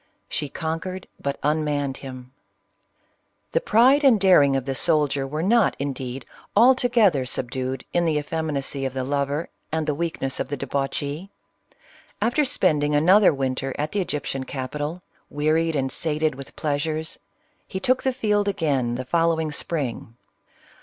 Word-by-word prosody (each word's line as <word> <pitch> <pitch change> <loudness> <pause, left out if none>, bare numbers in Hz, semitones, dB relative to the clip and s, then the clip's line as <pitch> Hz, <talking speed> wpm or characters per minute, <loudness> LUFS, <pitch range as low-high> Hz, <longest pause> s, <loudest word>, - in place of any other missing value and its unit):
She 145 - -3
conquered, 170 +5 -4 0.2
but 140 0 -2
unmanned 145 -2 0
him. 130 -1 -10 1.2
The - - +1
pride 270 - +5
and 255 -6 +6
daring 165 -8 +5
of 135 -2 -1
the 135 - -1
soldier 145 -2 +1
were 155 +3 -3
not, 230 +3 +3
indeed, 135 -2 -4 0.3
altogether 240 - +4
subdued 130 +1 -3
in 175 0 +2
the 160 -2 +1
effeminacy 145 -2 -2
of 135 -1 -2
the 130 - -1
lover, 140 +3 -1 0.2
and 160 0 -1
the 150 - 0
weakness 145 -4 -2
of - - -1
the 145 - -3
debauchee. 145 +6 -3 0.9
After 240 +8 +2
spending 150 - +2
an 155 +5 +4
other 205 0 +7
winter 135 -1 -2
at 150 +1 -2
'the 205 - 0
Egyptian 145 -5 -3
capitol, 145 +6 -5 0.3
wearied 155 +2 +1
and 135 -2 0
sated 155 -1 0
with 135 +1 -10
pleasure, 155 +1 -1 0.6
he 190 - -4
took 255 +6 +2
the 265 - +1
field 210 -5 0
again 140 -11 0
the 130 +1 -4
following 165 +1 +1
spring. 140 -7 -3
150 Hz, 145 wpm, -24 LUFS, 135-175 Hz, 1.2 s, other